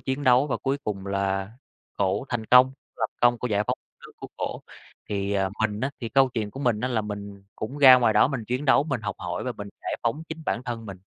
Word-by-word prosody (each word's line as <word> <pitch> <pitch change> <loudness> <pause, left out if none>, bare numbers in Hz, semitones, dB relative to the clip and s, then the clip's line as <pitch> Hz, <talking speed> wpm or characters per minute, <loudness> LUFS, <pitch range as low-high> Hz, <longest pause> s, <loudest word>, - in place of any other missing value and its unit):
chiến 135 +2 -3
đấu 125 +2 +5
và 140 - -1
cuối 135 +1 -1
cùng 100 -2 -4
là 100 0 -1 0.5
cổ 100 +3 +1
thành 120 -2 -2
công, 125 +2 +6 0.2
lập 110 - 0
công 120 0 +4
cô 125 - -3
giải 105 -2 +1
phóng - - -1
đất - - -79
nước - - -16
của - - -9
cổ. - - -4 0.5
Thì, 100 -1 -2
ờ, 95 -1 +1
mình 105 -1 0
á, 130 - -1
thì 115 - -3
câu 135 +2 +4
chuyện 110 -4 -3
của 135 - -8
mình 120 -6 +1
á, 125 - -1
là 120 -3 0
mình 100 -1 -7
cũng 130 +7 -5
ra 130 -3 +10
ngoài 120 -3 +3
đó 105 - +5
mình 130 -6 -4
chiến 125 +6 -2
đấu, 135 0 +4
mình 135 -6 -2
học 100 -2 -4
hỏi 90 0 -4
và 125 - -2
mình 105 -3 -8
giải - - -3
phóng 120 +7 -1
chính 160 0 -7
bản 120 - -1
thân 115 -3 -5
mình. 95 -2 -8
115 Hz, 260 wpm, -25 LUFS, 100-130 Hz, 0.5 s, ra